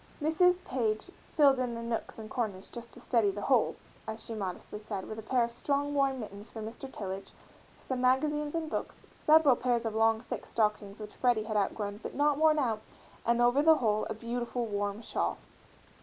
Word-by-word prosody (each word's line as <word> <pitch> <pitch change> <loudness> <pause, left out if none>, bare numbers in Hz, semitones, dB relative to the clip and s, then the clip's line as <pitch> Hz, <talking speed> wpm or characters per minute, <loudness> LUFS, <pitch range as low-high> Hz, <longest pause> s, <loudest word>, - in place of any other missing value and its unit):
Mrs. 340 +4 +4
Page 225 +4 -1 0.2
"filled 280 -3 +5
in 245 -2 -1
the 230 - -5
nooks 230 -1 -3
and 220 -1 -7
corners 215 -5 -3
just 235 -1 -8
to - - -12
steady 230 -5 +2
the 200 +1 -4
whole," 255 -5 +3 0.3
as 220 0 -5
she 230 - -6
modestly 200 0 -5
said, 205 -3 -5
with 215 - -6
a - - -5
pair 245 +2 +2
of 235 - -2
strong 285 +4 -1
warm 275 -2 +2
mittens 205 0 -8
for 225 - -8
Mr. 230 +5 -7
Tillage, 195 -3 -6 0.4
some 255 -1 -4
magazines 295 +4 +2
and 325 -1 -1
books, - - -5
several 305 -4 +5
pairs 240 -1 0
of 225 - -1
long 225 0 +3
thick 245 - -6
stockings 210 -2 0
which 210 -1 -8
Freddie 240 -4 +2
had 215 0 -4
outgrown 205 0 -1
but - - -6
not 290 0 +2
worn 310 -1 +5
out, 230 -7 0 0.5
and 235 +1 +4
over 245 +4 +4
the 320 +1 +7
whole 215 -6 +1
a 220 - -3
beautiful 240 +1 -3
warm 205 0 -2
shawl. - - -1
235 Hz, 200 wpm, -31 LUFS, 215-270 Hz, 0.5 s, the